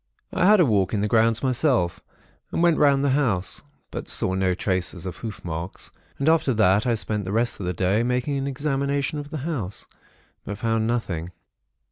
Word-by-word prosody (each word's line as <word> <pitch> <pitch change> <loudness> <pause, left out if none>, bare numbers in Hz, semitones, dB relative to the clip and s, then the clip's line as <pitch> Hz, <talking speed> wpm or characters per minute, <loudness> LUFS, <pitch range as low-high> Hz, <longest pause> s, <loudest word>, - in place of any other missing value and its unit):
"I 180 0 +3
had 210 0 +6
a 175 - +6
walk 100 -4 +1
in 100 - 0
the 105 - +1
grounds 115 +1 +2
myself, 125 - +1 0.5
and 170 - 0
went 170 -2 +4
round 140 -1 +4
the 140 - +2
house, 120 -10 0 0.3
but - - -6
saw 95 - +2
no 95 -1 +1
traces 90 -2 -2
of 90 -2 -5
hoof 110 -5 -7
marks; 85 +2 -5 0.3
and 140 - -2
after 160 -6 +3
that, 105 +1 +3
I 120 - +2
spent 105 -1 -2
the 95 - -4
rest 115 +2 0
of 95 - -4
the 90 - -1
day, 95 +5 +1
making 125 +4 0
an 135 0 -2
examination 140 +1 -1
of 145 0 -7
the 155 - -5
house; 120 - -4 0.6
but 100 - -6
found 115 0 0
nothing. 95 -8 -2
115 Hz, 195 wpm, -24 LUFS, 95-140 Hz, 0.6 s, had